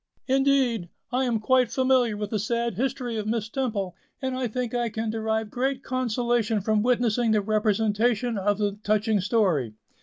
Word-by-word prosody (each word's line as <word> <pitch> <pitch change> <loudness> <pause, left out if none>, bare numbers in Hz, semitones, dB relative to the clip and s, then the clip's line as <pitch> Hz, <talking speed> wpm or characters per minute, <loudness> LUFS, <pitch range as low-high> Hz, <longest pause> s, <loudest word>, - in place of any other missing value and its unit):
"Indeed! 265 -8 +2 0.2
I 255 +2 +1
am 235 -3 0
quite 255 +2 +2
familiar 255 -4 +2
with 210 -1 -4
the 215 - 0
sad 235 +3 -1
history 245 +1 -2
of 215 -1 -3
Miss 220 -1 -1
Temple, 220 -8 -2 0.2
and 260 -1 -2
I 255 -1 -1
think 245 +1 -3
I 240 -1 0
can 220 0 -3
derive 220 -1 -2
great 265 +1 -1
consolation 240 -3 0
from 215 +1 +1
witnessing 240 -1 +2
the 215 -1 +3
representation 215 +2 +1
of 205 0 +1
the 205 -1 -1
touching 215 -1 +1
story." 180 - +1
225 Hz, 170 wpm, -26 LUFS, 210-250 Hz, 0.2 s, the